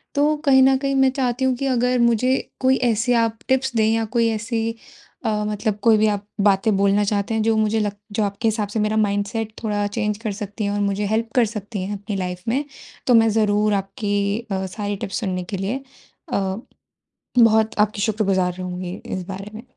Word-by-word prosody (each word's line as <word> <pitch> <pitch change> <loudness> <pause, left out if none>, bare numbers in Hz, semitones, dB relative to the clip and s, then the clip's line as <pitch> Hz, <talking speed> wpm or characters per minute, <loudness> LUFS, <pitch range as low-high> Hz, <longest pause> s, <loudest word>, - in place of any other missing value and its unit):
तो 295 +2 +3
कहीं 265 -2 +6
न 265 0 +5
कहीं 275 +1 -1
मैं 265 0 +5
चाहती 260 -1 -1
हूँ 260 -1 +2
कि 275 - -3
अगर 250 -1 +2
मुझे 235 +2 +3 0.2
कोई 260 0 +3
ऐसी 230 +3 +1
आप 225 -1 -1
टिप्स 265 -1 +1
दें 220 -1 +3
या 225 0 +1
कोई 230 -1 +4
ऐसी 225 +1 -2 0.6
अ, 210 -1 0
मतलब 210 0 -1
कोई 225 -2 +6
भी 215 +1 +3
आप 205 -1 -1 0.2
बातें 200 +1 +3
बोलना 200 +1 +3
चाहते 205 +1 -1
हैं 220 - +1
जो 225 0 +2
मुझे 215 0 +2
लग 205 -2 -1 0.2
जो 210 +1 0
आपके 200 +2 -1
हिसाब 215 -1 0
से 220 - -2
मेरा 215 +1 +1
माइंडसेट 210 +1 -1
थोड़ा 205 -2 0
चेंज 210 0 -2
कर 220 -1 -4
सकती 205 +1 -5
है 200 - 0
और 205 - -1
मुझे 200 0 0
हेल्प 225 +2 0
कर 245 - +5
सकती 210 -1 -5
हैं 200 +2 -4
अपनी 205 +1 -5
लाइफ 180 -1 -4
में, 260 +6 +1 0.4
तो 250 - +5
मैं 225 -1 +6
ज़रूर 210 -1 +2
आपकी 200 +1 -1
अ, 190 0 -1
सारी 205 +2 -4
टिप्स 195 - -3
सुनने 185 -5 -2
के - - 0
लिए 215 +8 -3 0.5
अ, - - +2 1.0
बहुत 220 -1 +4
आपकी 210 0 +2
शुक्रगुज़ार 195 -4 +1
रहूँगी 180 0 -5
इस 185 - -4
बारे 195 +2 -7
में। 225 - -8
215 Hz, 205 wpm, -22 LUFS, 200-230 Hz, 1.0 s, कहीं